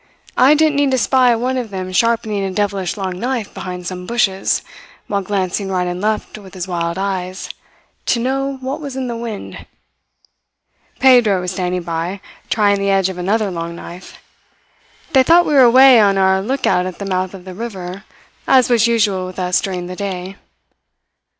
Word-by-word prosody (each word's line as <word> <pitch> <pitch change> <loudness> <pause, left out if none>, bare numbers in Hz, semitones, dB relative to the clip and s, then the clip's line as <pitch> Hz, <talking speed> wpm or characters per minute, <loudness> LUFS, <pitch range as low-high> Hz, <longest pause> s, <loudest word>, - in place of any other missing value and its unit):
I 265 +4 +6
didn't 305 -1 +2
need 285 -1 +3
to 260 - +1
spy 250 +1 +3
one 255 +3 -1
of 245 -3 -3
them 185 -2 -5
sharpening 220 0 +1
a 195 - -2
devilish 195 -2 -2
long 185 -2 -4
knife 240 -2 -3
behind 180 -1 -7
some 180 0 -6
bushes, 195 -5 0 0.4
while 200 -1 -1
glancing 195 0 -2
right 180 -1 0
and 180 0 -4
left 215 0 -2
with 195 -2 -14
his 185 0 -5
wild 170 -1 -2
eyes, 190 -1 -3 0.6
to 235 - +2
know 270 +2 -1
what 265 +4 -4
was 280 -3 -6
in 265 -1 -3
the 235 - -4
wind. 230 -3 -7 1.4
Pedro 245 -7 +5
was 180 0 -3
standing 180 -1 -2
by, 170 +3 -3 0.3
trying 205 -2 +2
the 200 0 0
edge 195 -1 +2
of 185 -1 -7
another 205 +3 0
long 170 -1 -5
knife. 175 +1 -11 1.0
They 265 - +6
thought 340 +6 +5
we 300 - 0
were 275 - +6
away 255 0 +7
on 200 -1 +3
our 190 0 +3
lookout 210 -5 0
at 185 - -7
the 200 - -6
mouth 185 0 -2
of 185 -1 -12
the 185 - -8
river, 195 -3 -7 0.4
as 255 -2 +4
was 235 -1 +4
usual 205 -5 +1
with 185 - -10
us 180 -1 +1
during 180 -2 -4
the 180 +1 -7
day. 190 -1 -5
200 Hz, 180 wpm, -18 LUFS, 185-235 Hz, 1.4 s, away